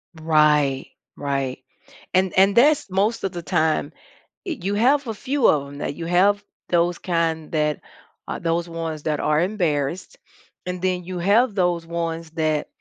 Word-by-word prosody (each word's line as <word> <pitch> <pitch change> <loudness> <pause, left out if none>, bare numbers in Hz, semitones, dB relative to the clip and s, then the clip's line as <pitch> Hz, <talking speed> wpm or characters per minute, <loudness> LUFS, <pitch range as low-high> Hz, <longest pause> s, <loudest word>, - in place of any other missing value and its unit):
Right, 150 -4 +2 0.3
right, 135 -2 -2 0.5
and 185 0 +2
and 195 +1 +5
that's, 285 0 +4
most 200 +5 0
of 195 - -1
the 175 -1 -6
time 155 -2 0 0.5
eh, 345 -5 -3
you 200 +3 -1
have 265 +5 +3
a 225 - -2
few 265 +5 +1
of 140 -2 +2
'em 140 0 -10
that 145 - -3
you 165 - -6
have 195 +4 +3 0.3
those 175 0 +2
kind 165 -3 -1
that 150 -2 0 0.5
uh, - - -4
those 170 +1 -1
ones 165 -2 -5
that 150 -2 -1
are 150 +1 +2
embarrassed, 175 - -1 0.5
and 180 0 -4
then 180 -1 0
you 180 0 -5
have 205 +5 +3
those 175 -3 +1
ones 165 -1 -4
that 155 -2 -1
170 Hz, 165 wpm, -22 LUFS, 155-195 Hz, 0.5 s, and